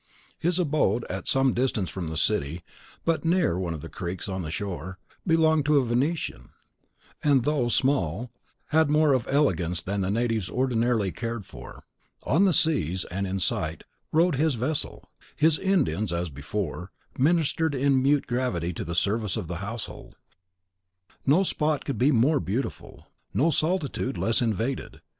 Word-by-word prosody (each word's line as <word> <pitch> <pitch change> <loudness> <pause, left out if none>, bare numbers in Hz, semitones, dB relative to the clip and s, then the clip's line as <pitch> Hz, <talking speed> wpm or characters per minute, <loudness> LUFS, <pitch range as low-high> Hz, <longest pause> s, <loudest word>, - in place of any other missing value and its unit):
His 175 +1 0
abode, 145 - +1
at 95 0 -5
some 135 -1 +3
distance 120 -6 0
from 90 -3 -4
the 80 0 -4
city, 85 -2 0 0.4
but 165 -1 +1
near 165 - +2
one 85 -3 -2
of 75 - -8
the - - -6
creeks 85 +4 -5
on 95 -1 -3
the 80 - -5
shore, 95 +1 -5 0.3
belonged 160 -3 +3
to 150 -1 +5
a 135 - +3
Venetian, 135 +8 -1 0.7
and, 140 -4 +3
though 145 -3 +1
small, 120 - 0 0.4
had 155 0 +3
more 150 -1 +4
of 130 -3 0
elegance 90 - +1
than 100 +2 -2
the 95 - 0
natives 115 -2 0
ordinarily 120 -5 +1
cared 115 -1 -4
for. - - -11 0.4
On 170 +9 +3
the 190 - +4
seas, 135 - +1
and 100 +2 -2
in 95 +1 -2
sight, 80 -1 -1 0.3
rode 165 -1 +3
his 155 -1 +2
vessel. 135 +6 -3 0.3
His 155 0 +3
Indians, 155 - +1
as 85 -1 -2
before, 90 +5 -4 0.3
ministered 160 +1 +2
in 135 0 +3
mute 140 +1 +3
gravity 120 -9 -1
to - - -4
the 85 +1 -4
service 105 +3 0
of 85 - -4
the 85 +1 -4
household. 100 +4 -7 1.1
No 160 +8 +5
spot 155 -5 0
could 140 - -3
be 135 +4 +4
more 140 +4 +3
beautiful, 120 +7 -4 0.3
no 145 +10 +3
solitude 155 -4 -1
less 115 +2 +1
invaded. 115 +3 -2
120 Hz, 160 wpm, -26 LUFS, 95-150 Hz, 1.1 s, to